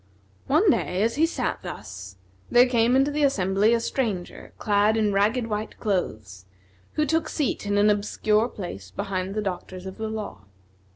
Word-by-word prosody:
One 335 +7 +4
day 185 -6 0
as 230 +1 +1
he 315 +5 +3
sat - - -2
thus, 95 0 -8 0.3
there 245 +1 +6
came 240 0 +3
into 270 +2 +3
the 300 +1 -1
assembly 205 -5 +2
a - - +1
stranger, 225 -7 -3
clad 210 +1 +2
in 210 -2 +1
ragged 215 +5 +2
white 215 -1 -4
clothes, 110 - -3 0.5
who 305 - +1
took 320 +1 0
seat 275 -7 -2
in 205 0 +1
an 210 +1 +5
obscure 210 +2 +1
place 100 - -7
behind 195 - -3
the 215 - -1
doctors 185 -1 -5
of 190 +3 -8
the 220 0 -3
law. 215 - -6
210 Hz, 170 wpm, -25 LUFS, 190-240 Hz, 0.5 s, there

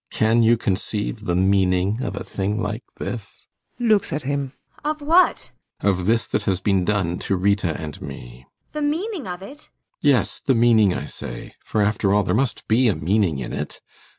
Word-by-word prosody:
] - - -53
Can 115 +2 +4
you 115 +1 +5
conceive 105 +1 -2
the 85 - 0
meaning 95 +3 +2
of 105 -6 -3
a - - -5
thing 100 +2 -2
like 110 +2 -3 0.2
this? 110 -4 -6 0.3
ASTA. - - -4
[Looks 215 -3 +4
at 150 - -2
him.] 140 0 -2 0.3
Of 305 +1 -1
what? 335 +5 +3 0.3
ALLMERS. 100 -2 +2
Of 90 - -4
this 115 +1 +2
that 105 - -1
has 95 -2 +1
been 95 -2 +1
done 90 -3 0
to 100 - -1
Rita 95 -3 +1
and 75 -4 -7
me. - - -9
ASTA. - - -47
The 300 - -4
meaning 325 - -2
of 180 +1 -6
it? - - -6
ALLMERS. 290 +8 -12
[Impatiently.] 145 - -3
Yes, 130 -4 +2
the 135 - +2
meaning, 115 -4 +5
I 70 - -4
say. - - -8
For, 105 - 0
after 100 -1 +1
all, 105 - +3
there - - -1
must 130 +2 -1
be 120 +3 +4
a 105 - +2
meaning 90 0 +1
in 65 -2 -5
it. - - -5
105 Hz, 210 wpm, -22 LUFS, 95-130 Hz, 0.3 s, you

